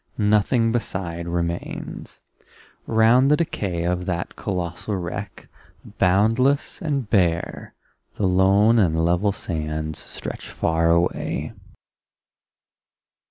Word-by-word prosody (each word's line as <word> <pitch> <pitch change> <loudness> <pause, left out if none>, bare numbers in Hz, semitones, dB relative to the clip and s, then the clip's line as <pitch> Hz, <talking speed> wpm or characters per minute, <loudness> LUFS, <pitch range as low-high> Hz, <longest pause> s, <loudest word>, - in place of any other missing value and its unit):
Nothing 110 +3 +2
beside 90 -7 -3
remains. 85 0 -4 0.7
Round 115 +4 +4
the 150 - +4
decay 95 - -2
Of 90 +1 -1
that 85 -2 -3
colossal 90 +1 -3
wreck, 90 +3 -6 0.5
boundless 115 +10 +2
and 140 -7 -1
bare 85 -5 0 0.4
The 105 - -1
lone 100 +5 +4
and 80 -4 +2
level 90 +4 +2
sands 80 -5 -4
stretch - - -8
far 80 +1 +1
away. 85 +1 0
95 Hz, 95 wpm, -23 LUFS, 85-110 Hz, 0.7 s, Round